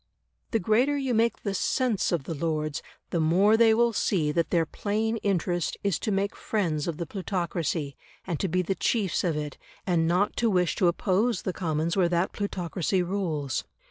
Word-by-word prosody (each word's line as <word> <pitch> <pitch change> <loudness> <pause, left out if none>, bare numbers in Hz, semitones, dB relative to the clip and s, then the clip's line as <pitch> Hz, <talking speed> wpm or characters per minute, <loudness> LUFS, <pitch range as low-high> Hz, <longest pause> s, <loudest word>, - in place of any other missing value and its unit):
The 225 - +1
greater 235 +8 +2
you 265 -3 -1
make 230 0 +1
the 200 - -1
SENSE 230 +2 0
of 170 -5 0
the 165 - -4
Lords, 155 -1 -2 0.3
the 170 - 0
more 185 +7 +4
they 225 0 +5
will 235 +1 +3
see 165 -7 +1
that 165 +2 0
their 165 -2 +2
plain 220 +6 -1
interest 180 -4 -1
is 200 -5 +1
to 215 - -2
make 200 +1 0
friends 170 -9 -1
of 165 -3 -3
the 170 - -3
plutocracy, 170 -5 -2 0.3
and 170 -5 -3
to 195 - 0
be 180 +1 +1
the 195 - 0
chiefs 195 0 0
of 165 -4 0
it, 150 -2 -5 0.3
and 170 -3 +2
not 180 +5 +1
to 235 - +2
wish 180 -4 +2
to 185 - +3
oppose 200 +6 +1
the 185 - -2
Commons 165 -1 -1
where 180 -3 +3
that 175 +1 +1
plutocracy 185 -2 -1
rules. 170 -8 -2
180 Hz, 190 wpm, -27 LUFS, 165-205 Hz, 0.3 s, they